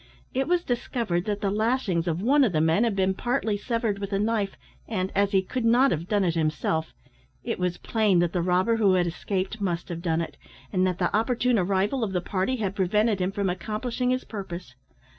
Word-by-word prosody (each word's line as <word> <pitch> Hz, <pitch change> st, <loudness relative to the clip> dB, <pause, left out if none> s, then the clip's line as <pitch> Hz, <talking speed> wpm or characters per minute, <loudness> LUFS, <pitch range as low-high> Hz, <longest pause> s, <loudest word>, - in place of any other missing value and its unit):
It 265 Hz, +1 st, 0 dB
was 350 Hz, 0 st, +2 dB
discovered 235 Hz, -, -1 dB
that 205 Hz, -1 st, -2 dB
the 195 Hz, -, 0 dB
lashings 210 Hz, -5 st, 0 dB
of 170 Hz, +3 st, -1 dB
one 280 Hz, +4 st, +5 dB
of 220 Hz, -8 st, +2 dB
the 155 Hz, -, +2 dB
men 160 Hz, +8 st, +3 dB
had 225 Hz, -4 st, 0 dB
been 190 Hz, -1 st, +2 dB
partly 235 Hz, 0 st, -1 dB
severed 225 Hz, -1 st, -1 dB
with 200 Hz, 0 st, -5 dB
a 195 Hz, -, +1 dB
knife, 210 Hz, -1 st, 0 dB, 0.3 s
and, 190 Hz, -4 st, -2 dB
as 200 Hz, 0 st, +2 dB
he 190 Hz, -2 st, +3 dB
could 250 Hz, +5 st, -3 dB
not 245 Hz, +4 st, +4 dB
have 165 Hz, +2 st, -2 dB
done 205 Hz, -1 st, +2 dB
it 175 Hz, -3 st, +1 dB
himself, 160 Hz, 0 st, -1 dB, 0.5 s
it -, -, -3 dB
was 180 Hz, -1 st, -1 dB
plain 215 Hz, -5 st, +1 dB
that 175 Hz, -1 st, +2 dB
the 180 Hz, -, +1 dB
robber 185 Hz, +6 st, +2 dB
who 200 Hz, -4 st, +4 dB
had 180 Hz, -1 st, +3 dB
escaped 190 Hz, +4 st, -3 dB
must 175 Hz, -3 st, -2 dB
have 170 Hz, -1 st, -4 dB
done 165 Hz, -1 st, 0 dB
it, 155 Hz, -4 st, -6 dB, 0.4 s
and 185 Hz, -1 st, +3 dB
that 180 Hz, -2 st, -1 dB
the 180 Hz, +1 st, 0 dB
opportune 240 Hz, +1 st, +2 dB
arrival 195 Hz, +7 st, +1 dB
of 200 Hz, -3 st, -2 dB
the 180 Hz, -, +1 dB
party 190 Hz, +7 st, -1 dB
had 205 Hz, -6 st, -2 dB
prevented 210 Hz, +2 st, +2 dB
him 185 Hz, +1 st, 0 dB
from 200 Hz, 0 st, -1 dB
accomplishing 220 Hz, +7 st, -2 dB
his 255 Hz, 0 st, 0 dB
purpose. 180 Hz, -, -7 dB
200 Hz, 215 wpm, -26 LUFS, 180-225 Hz, 0.5 s, one